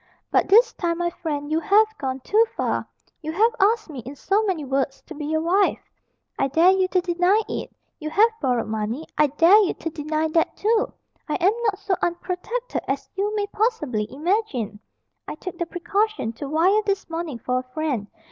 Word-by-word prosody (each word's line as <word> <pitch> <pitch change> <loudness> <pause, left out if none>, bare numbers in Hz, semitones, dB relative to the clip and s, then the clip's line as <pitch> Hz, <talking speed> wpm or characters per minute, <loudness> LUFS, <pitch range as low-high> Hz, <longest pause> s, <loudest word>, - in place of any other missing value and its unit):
But - - +3
this 450 +3 +6
time, 340 -2 -1
my 345 0 -1
friend, 295 -3 -4
you 315 - +2
have 420 +4 +5
gone 265 -1 -3
too 430 - +4
far. - - -1 0.3
You 315 0 -4
have 450 +7 +3
asked 430 +3 +3
me, 295 -6 -8
in 255 +4 -8
so 395 +9 +1
many 350 -7 -1
words, 270 0 -1
to - - -9
be 295 -1 -5
your 315 +1 0
wife 380 +4 +3 0.6
I - - +2
dare 325 +7 +5
you 380 -1 +2
to 370 0 +1
deny 355 +3 +2
it! - - -4 0.3
You 310 -1 -4
have 435 +8 +4
borrowed 250 -4 +1
money 220 +7 -3
I 300 - +4
dare 330 +9 +6
you 385 - 0
to 325 - -4
deny 310 +1 -1
that 325 +1 +1
too! 440 +1 +1 0.4
I - - 0
am 375 +4 +3
not 410 -3 +1
so 395 -1 -1
unprotected 360 +8 -3
as 270 +1 -3
you 400 +2 -1
may 410 -1 0
possibly 330 - -1
imagine. 295 - -1 0.5
I - - -5
took 350 +2 -8
the 345 - -1
precaution 395 - -1
to 275 +5 -7
wire 360 +8 +3
this 400 -1 -1
morning 330 -5 -4
for 250 +2 -1
a - - -6
friend. 280 -10 -1
340 Hz, 195 wpm, -23 LUFS, 290-400 Hz, 0.6 s, this